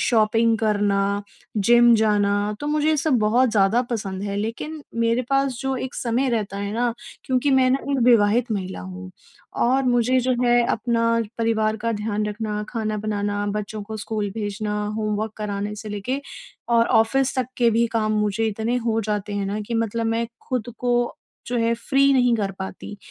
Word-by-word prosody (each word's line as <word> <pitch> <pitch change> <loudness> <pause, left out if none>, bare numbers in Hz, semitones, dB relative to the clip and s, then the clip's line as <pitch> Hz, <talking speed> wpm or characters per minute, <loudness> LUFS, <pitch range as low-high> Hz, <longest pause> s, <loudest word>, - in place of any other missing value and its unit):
Shopping 225 0 +3
करना, 205 -2 +1 0.6
gym 235 +3 +6
जाना। 205 -1 +2
तो 290 - -4
मुझे 300 0 +1
ये 315 - +3
सब 280 -3 +2
बहुत 230 +4 +3
ज़्यादा 215 +3 +3
पसंद 195 -5 -3
है 200 0 -3
लेकिन 235 +9 -4 0.2
मेरे 230 +2 +2
पास 275 -2 +1
जो 265 -1 -1
एक 255 0 -5
समय 250 +3 0
रहता 210 -4 -2
है 200 0 -3
ना, 235 +1 0 0.3
क्योंकि 260 +2 +1
मैं 260 -1 +4
ना 265 - +3
एक 275 - +1
विवाहित 230 0 +4
महिला 190 - -4
हूँ 90 0 -8 0.5
और 260 +3 +3
मुझे 245 0 +3
जो 255 +1 +1
है 240 0 +4
अपना 230 +1 0 0.4
परिवार 220 -1 +1
का 230 0 0
ध्यान 210 0 -2
रखना, 210 0 -3
खाना 215 -2 -2
बनाना, 205 -1 -2
बच्चों 210 +1 -4
को 220 +2 -7
स्कूल 215 -1 -3
भेजना, 210 0 -3 0.2
होमवर्क 215 0 -2
कराने 205 0 -3
से 215 - -7
लेके 210 +7 -3 0.5
और 235 -1 +4
ऑफिस 260 +4 +2
तक 255 - +1
के 240 -2 +4
भी 230 +1 +2
काम 215 -2 +1
मुझे 210 +2 0
इतने 220 +3 -1
हो 225 -1 +1
जाते 210 -1 -3
हैं 200 -1 -1
ना 205 +2 -2
कि 215 +3 -5
मतलब 230 0 -1
मैं 230 +1 0 0.2
खुद 250 -3 -2
को 240 -1 0 0.3
जो 245 - -2
है 230 0 +2
फ्री 275 +4 +2
नहीं 245 -2 +4
कर 200 -3 -1
पाती। 190 +1 -7
225 Hz, 180 wpm, -23 LUFS, 210-245 Hz, 0.6 s, gym